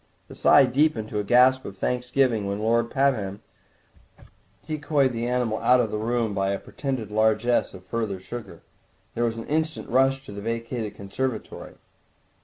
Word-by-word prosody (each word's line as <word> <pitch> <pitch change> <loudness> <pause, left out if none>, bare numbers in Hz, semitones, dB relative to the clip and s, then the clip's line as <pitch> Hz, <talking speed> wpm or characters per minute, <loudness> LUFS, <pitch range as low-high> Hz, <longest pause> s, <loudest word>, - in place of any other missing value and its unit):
The - - -10
sigh - - +6
deepened 125 -4 +1
to 105 - -2
a - - -1
gasp 130 +4 +4
of 100 - -9
thanks 125 +4 -2
giving 125 -6 +2
when 100 0 -2
Lord 115 +2 +1
Pabham 115 -8 0 1.2
decoyed 145 -3 0
the 115 +1 -2
animal 125 -3 0
out 125 0 +4
of 115 -4 0
the 105 - -2
room 115 -1 -1
by 95 -1 0
a 100 - 0
pretended 130 -7 -5
largesse 110 +1 +2
of 90 -1 -13
further 105 -2 -3
sugar. 100 -3 -9 0.5
There 120 - 0
was 115 -1 -2
an 115 - -6
instant 155 +1 -2
rush 135 +2 +2
to - - -10
the 100 0 -7
vacated 115 -1 -4
conservatory. 110 +5 -5
115 Hz, 170 wpm, -25 LUFS, 105-130 Hz, 1.2 s, sigh